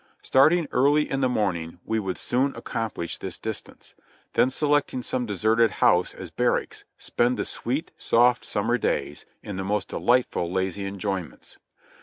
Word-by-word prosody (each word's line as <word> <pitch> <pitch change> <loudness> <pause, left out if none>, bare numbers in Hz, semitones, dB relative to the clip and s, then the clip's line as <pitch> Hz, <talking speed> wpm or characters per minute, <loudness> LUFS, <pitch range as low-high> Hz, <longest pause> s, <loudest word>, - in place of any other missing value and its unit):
Starting 155 +5 +4
early 145 +4 +3
in 135 0 -2
the 130 - +3
morning 90 -8 -1
we 110 0 0
would 95 -3 -3
soon 135 +3 0
accom 115 -1 -3
plish 85 - -4
the - - -4
distance; - - -6 0.4
then 130 - +4
selecting 145 -2 +1
some 125 -1 -2
deserted 110 +3 +3
house 90 -2 +2
as - - -8
bar - - +2
racks, - - -4
spend 120 +1 0
the - - -1
sweet, 135 +7 -2
soft 120 +1 +3
summer 120 +4 0
days - - -2 0.2
in 100 -2 -6
the 95 - -2
most 100 +1 -1
delightful, 120 -8 +1
lazy 95 +1 -1
enjoyments. 95 -3 -5
115 Hz, 160 wpm, -25 LUFS, 95-130 Hz, 0.4 s, Starting